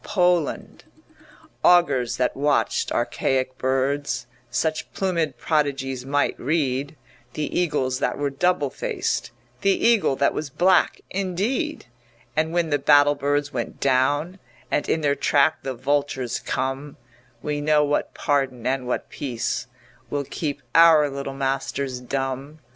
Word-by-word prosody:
POLAND 175 -6 0 0.8
Augurs 145 -9 +4
that 125 - 0
watched 145 +1 +1
archaic 130 -1 0
birds 130 -1 0 0.2
Such 155 +5 -1
plumèd 165 -8 -1
prodigies 135 -4 -1
might 145 +1 +1
read, 140 0 -1 0.4
The 150 - -3
eagles 140 -7 0
that - - -1
were 145 -1 -1
double 145 -1 +1
faced, - - -2 0.3
The 195 - +2
eagle 215 -12 +3
that 140 +1 +2
was 150 -2 -4
black 180 +6 +3
indeed; 200 - -2 0.5
And 155 +1 +1
when 170 -2 0
the 145 - +2
battle 145 +1 +5
birds 145 0 -1
went 120 -3 -4
down 145 +7 +1 0.3
And 145 - 0
in 160 - +1
their 145 -2 +2
track 145 +2 +2
the 135 -1 -4
vultures 135 -1 -1
come, 135 +3 -3 0.5
We 150 -1 -2
know 150 0 +3
what 145 0 -1
pardon 135 -4 -1
and 130 -1 -1
what 125 - -2
peace 125 -5 -3 0.4
Will 145 -1 -1
keep 145 +1 -4
our 160 -3 +6
little 135 0 -5
masters 135 -1 -2
dumb. 135 +3 -4
145 Hz, 130 wpm, -23 LUFS, 135-155 Hz, 0.8 s, our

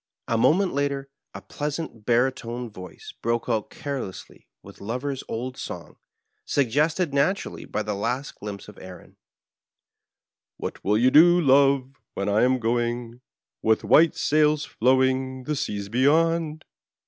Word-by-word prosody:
A 115 - 0
moment 175 - +3
later 140 -1 -2 0.3
a - - -8
pleasant 145 -7 -5
baritone 120 -1 0
voice 90 -2 -11
broke 115 0 -1
out 110 -3 -1
carelessly 140 -11 -7 0.2
with - - -14
Lov 120 +7 -4
er's 140 -2 -3
old 125 +3 -5
song, - - -8 0.5
suggested 145 +5 +1
naturally 150 +8 0
by 105 - -3
the 105 0 -3
last 120 +7 -3
glimpse 100 -1 -7
of 105 - -13
Erin 95 -1 -12 0.7
— - - -66
What - - -6
will 105 +2 +2
you 125 +3 +4
do, 175 +4 +7
love, 135 -3 +4 0.2
when 100 +1 -2
I 105 +2 +3
am 130 +1 +3
going, 120 0 -2 0.4
With 110 0 +2
white 165 +1 +5
sails 150 0 +2
flowing, 130 +1 +1
the 150 +4 -2
seas 100 -7 -3
beyond 155 +6 +1
130 Hz, 140 wpm, -25 LUFS, 115-145 Hz, 0.7 s, do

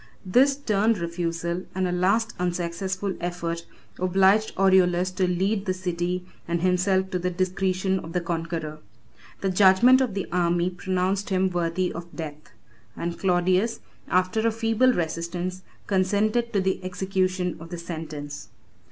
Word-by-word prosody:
7 185 - -9
This 270 +6 +5
stern 225 -5 +1
refusal, 170 -1 -3
and 185 -1 +1
a - - -1
last 200 +6 +1
unsuccessful 180 +2 -2
effort, 170 -1 -3 0.3
obliged 190 +4 +3
Aureolus 185 -1 +4
to 185 0 0
yield 195 +3 0
the 185 -2 0
city 180 0 -2 0.2
and 170 0 -1
himself 185 +1 +2
to 180 - -1
the 180 +1 -1
discretion 185 +1 0
of 165 -1 -9
the 180 - +1
conqueror. 165 -2 -4 0.6
The 195 - 0
judgment 200 +7 +6
of 240 -7 -1
the 195 - -2
army 175 0 +1
pronounced 185 +2 -1
him 190 -1 +1
worthy 175 +1 -1
of 170 +1 -9
death; 155 -2 -7 0.5
and 170 0 -4
Claudius, 185 +4 +2 0.3
after 185 +4 +1
a - - +2
feeble 225 +3 +2
resistance, 175 0 -3 0.2
consented 210 +5 +1
to 200 - +1
the 190 0 -1
execution 185 -1 -1
of 165 +1 -10
the 175 - -5
sentence. 155 -4 -7
185 Hz, 145 wpm, -25 LUFS, 175-195 Hz, 0.6 s, judgment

